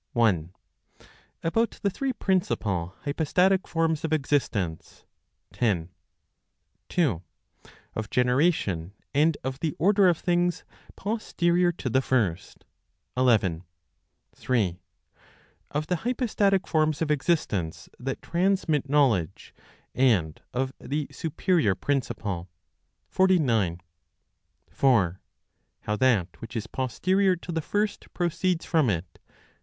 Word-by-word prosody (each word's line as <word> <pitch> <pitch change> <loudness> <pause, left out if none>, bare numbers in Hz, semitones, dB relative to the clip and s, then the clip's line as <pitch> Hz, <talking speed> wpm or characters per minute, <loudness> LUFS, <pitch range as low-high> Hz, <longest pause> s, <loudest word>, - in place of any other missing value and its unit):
1. 95 - +2 0.9
About 225 +8 0
the 200 - +2
three 270 +7 -2
Principal 105 - -1
Hypostatic 180 +6 +1
Forms 165 -2 0
of 160 - -2
Existence, 135 - -1 0.5
10. 90 -8 0 1.0
2. 135 - +1 0.7
Of 110 -2 -4
Generation, 125 - +1 0.2
and 150 +2 +3
of 130 +1 -4
the 155 -2 -2
Order 195 +3 +4
of 170 - +2
Things 175 0 0 0.3
Posterior 180 -5 +1
to 155 - -6
the 130 +2 +2
First, 105 -11 -1 0.5
11. 105 -10 +2 0.7
3. 100 -9 0 0.9
Of 150 +1 -2
the 180 +2 0
Hypostatic 210 -4 +1
Forms 155 -1 +1
of 150 - -1
Existence 130 - -1
that 130 +1 -4
Transmit 170 -5 +1
Knowledge, 130 - +1 0.4
and 105 -12 +2
of 130 +1 -2
the 145 +1 -3
Superior 160 - +1
Principle, 105 -10 -2 0.6
49. 125 - +2 0.9
4. 100 -10 +2 0.6
How 105 - -2
that 105 -7 +1
which 115 +2 -8
is 110 -2 -2
Posterior 185 - +1
to 175 0 -8
the 160 -1 -1
First 205 +6 -2
Proceeds 175 0 0
from 155 -7 +2
it? 90 -3 -3
145 Hz, 105 wpm, -26 LUFS, 105-175 Hz, 1.0 s, Order